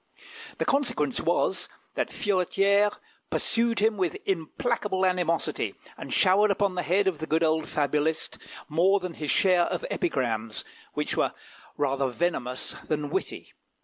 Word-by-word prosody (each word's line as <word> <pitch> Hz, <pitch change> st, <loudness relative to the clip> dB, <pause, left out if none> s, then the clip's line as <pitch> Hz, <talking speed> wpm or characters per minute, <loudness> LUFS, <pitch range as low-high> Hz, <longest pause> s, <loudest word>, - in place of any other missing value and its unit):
The -, -, -1 dB
consequence 280 Hz, +1 st, +1 dB
was, -, -, 0 dB, 0.2 s
that -, -, -1 dB
Furetière 200 Hz, +1 st, +2 dB, 0.3 s
pursued 230 Hz, 0 st, +1 dB
him 215 Hz, 0 st, +2 dB
with 180 Hz, -4 st, 0 dB
implacable 190 Hz, -, -1 dB
animosity, 180 Hz, -2 st, 0 dB, 0.2 s
and -, -, -8 dB
showered 200 Hz, +2 st, +4 dB
upon 200 Hz, -1 st, +1 dB
the 180 Hz, -, -1 dB
head 185 Hz, +5 st, +2 dB
of 175 Hz, -5 st, 0 dB
the 160 Hz, -, -4 dB
good 160 Hz, +2 st, +2 dB
old 160 Hz, -1 st, +1 dB
fabulist 150 Hz, +2 st, 0 dB, 0.3 s
more 180 Hz, +6 st, +3 dB
than 180 Hz, -2 st, -5 dB
his 150 Hz, -2 st, -5 dB
share 180 Hz, 0 st, +4 dB
of -, -, -3 dB
epigrams, 115 Hz, -, -1 dB, 0.3 s
which -, -, -1 dB
were -, -, +1 dB, 0.4 s
rather 135 Hz, -1 st, +1 dB
venomous 125 Hz, -3 st, -2 dB
than 150 Hz, -2 st, -2 dB
witty. -, -, -4 dB
180 Hz, 140 wpm, -27 LUFS, 155-200 Hz, 0.4 s, showered